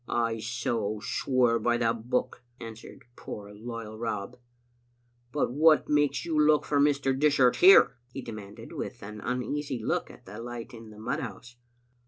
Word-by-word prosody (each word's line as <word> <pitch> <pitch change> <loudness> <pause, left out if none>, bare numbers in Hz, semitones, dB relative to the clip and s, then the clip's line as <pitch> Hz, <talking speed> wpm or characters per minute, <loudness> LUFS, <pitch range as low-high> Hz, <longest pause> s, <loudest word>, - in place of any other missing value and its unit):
" - - -36 0.2
I 115 0 -4
so 115 -2 -2
swear 120 +1 +1
by 120 0 +1
the 115 -1 +2
Book," 120 +3 -2 0.2
answered 115 -1 -10
poor 105 0 -8
loyal 110 0 -7
Rob. 115 +1 -4 0.5
" 120 0 -41
But 145 -3 0
what 155 +2 +4
makes 145 -1 +2
you 160 -2 0
look 150 0 +4
for 145 - +1
Mr. 140 -2 +2
Dishart 135 -3 +3
here?" 180 -8 +7
he 135 - -7
demanded, 105 -3 -9
with - - -6
an 105 +1 -8
uneasy 130 +3 -2
look 110 - -2
at - - -15
the 105 +4 -9
light 120 0 -7
in 115 -1 -11
the 105 - -14
mud 110 +4 -3
house. 120 0 -8
120 Hz, 170 wpm, -28 LUFS, 115-135 Hz, 0.5 s, here